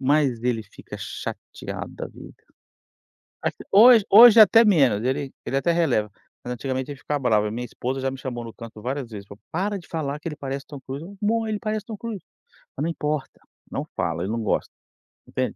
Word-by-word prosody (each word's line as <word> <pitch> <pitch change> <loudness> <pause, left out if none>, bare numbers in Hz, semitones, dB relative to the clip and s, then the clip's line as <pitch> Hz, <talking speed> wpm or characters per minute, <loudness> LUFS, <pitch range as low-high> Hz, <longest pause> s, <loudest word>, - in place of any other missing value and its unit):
mas 135 -4 +2
ele 120 -2 0
fica 100 - -11
chateado - - -6
da - - -5
vida, - - -13 1.1
até - - -3
hoje 225 +1 +8
hoje 230 +2 +10
até 225 +2 +8
menos, 135 - +4
ele 135 +1 -1
ele 135 - -1
até 170 +5 +2
releva, 135 -11 +1 0.3
mas 125 - -4
antigamente 130 +2 -3
ele 140 - -7
ficava 145 +1 -2
bravo, 110 -5 +2
a - - -2
minha 120 +3 -4
esposa 130 +3 -4
já 135 0 -1
me 135 - -7
chamou 120 -3 -5
no 115 - -9
canto 115 -2 -10
várias 130 0 -3
vezes, 100 -2 -8
para 100 - -11
o: - - -36
"Para 200 +4 -1
de 175 - -15
falar 150 -3 -3
que 165 - -4
ele 150 - -6
parece 135 0 -5
o - - -66
Tom 145 -2 -9
Cruise. 135 +4 -7 0.2
'Amor, 225 +1 +1
ele 215 -1 -1
parece 215 -2 -2
o - - -72
Tom 220 - -5
Cruise.' 215 -4 -6 0.5
Mas - - -2
não 165 - 0
importa, 150 -3 -3 0.3
não - - -4
fala, 85 -3 -1
ele 100 - -2
não 115 0 -2
gosta", 105 - -1 0.6
entende. - - -2
135 Hz, 215 wpm, -24 LUFS, 120-175 Hz, 1.1 s, hoje